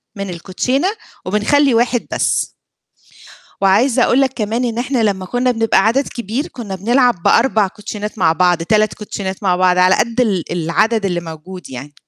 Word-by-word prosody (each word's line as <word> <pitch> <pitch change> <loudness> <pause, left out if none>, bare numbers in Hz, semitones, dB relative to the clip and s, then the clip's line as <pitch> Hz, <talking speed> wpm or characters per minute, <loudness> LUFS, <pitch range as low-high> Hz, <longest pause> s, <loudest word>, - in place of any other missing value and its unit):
من 200 -1 -5
الكوتشينة 200 - -1 0.4
وبنخلّي 245 +8 +2
1 240 +1 +1
بس. - - 0 1.1
وعايزة 230 +6 +3
أقول 260 - +3
لك 265 -1 +2
كمان 225 +3 -1
إن 235 -1 -2
إحنا 250 -1 -1
لمّا 190 -3 -1
كُنّا 245 +4 0
بنبقى 225 -4 +2
عدد 265 +5 +1
كبير، 240 +5 -4
كُنّا 215 -6 -7
بنلعب 240 -1 +1
ب4 220 -5 +3
كوتشينات 210 +1 -7
مع 160 -3 +3
بعض، 175 -1 +2
3 215 0 +1
كوتشينات 200 -2 -6
مع 180 -2 +2
بعض 180 0 +2
على 185 +1 +5
قد 235 +2 0
ال 195 -8 0
العدد 200 +6 0
اللي 175 -2 -1
موجود 165 +1 -10
يعني. 135 +3 -9
210 Hz, 165 wpm, -17 LUFS, 185-240 Hz, 1.1 s, على